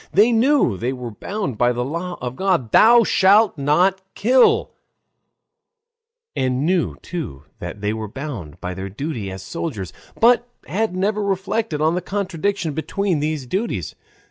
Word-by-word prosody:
They 215 +5 +5
knew 235 - +3
they 120 +5 -2
were 125 -2 -6
bound 190 - -4
by 120 0 +4
the 125 +1 -2
law 170 +5 -4
of 125 0 -4
God, 175 - 0
"Thou 235 +1 +7
shalt 205 +2 +4
not 175 +7 +2
kill," 250 +4 +4 1.6
and 130 +2 0
knew 180 0 +1
too 155 - -6 0.2
that 85 +4 -7
they 105 +1 0
were 110 -1 -4
bound 110 - -7
by 90 - -4
their 95 +1 -6
duty 115 -1 -4
as 95 0 -7
soldiers, 110 - -5 0.3
but 240 +1 +4 0.2
had 190 +6 -1
never 205 +3 0
reflected 195 -3 -1
on 160 +2 +3
the 180 - -1
contradiction 190 -3 -2
between 180 +2 -1
these 150 -2 -2
duties. 195 - -3
165 Hz, 150 wpm, -21 LUFS, 125-200 Hz, 1.6 s, Thou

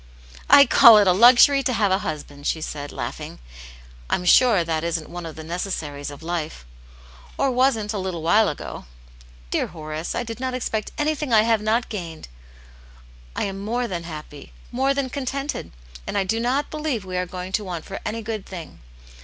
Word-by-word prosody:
"I 280 0 +9
call 235 -6 +8
it 205 - +5
a 185 - +5
luxury 245 +6 +7
to 255 -1 -1
have 205 -3 +1
a 190 - +3
husband," 145 -4 -6
she 160 - 0
said, 145 -2 -6
laughing. - - -6 0.4
" - - -21
I'm 180 - 0
sure 215 -1 +5
that 160 -1 -2
isn't 170 -2 -2
one 175 -1 -6
of 160 - -9
the 160 - -8
necessaries 160 -4 -4
of 145 +2 -11
life 165 - -4 0.4
— 60 0 -21
or 275 -1 +1
wasn't 245 -4 +1
a 205 - -2
little 185 -4 -4
while 210 +6 +4
ago. 145 - -7 0.7
Dear - - 0
Horace, 155 0 -6
I 245 - -1
did 230 0 -7
not 260 0 -2
expect 220 -4 -3
anything 300 -2 -1
I 215 -2 +6
have 225 -1 +2
not 220 +3 +1
gained. 165 - -7 1.1
I - - -1
am 195 -1 -4
more 235 +4 -2
than 175 -5 -5
happy, 150 -3 -9 0.2
more 265 +3 +1
than 275 -1 -1
contented, 275 +2 -4 0.4
and - - -2
I 200 - +2
do 220 +4 -1
not 260 +5 -1
believe 300 -9 -3
we 185 -1 -6
are 180 0 -1
going 180 +1 -7
to 210 - 0
want 175 -4 -6
for 195 - -6
any 225 +1 -4
good 215 -2 -4
thing. 175 -5 -9
195 Hz, 195 wpm, -23 LUFS, 165-240 Hz, 1.1 s, I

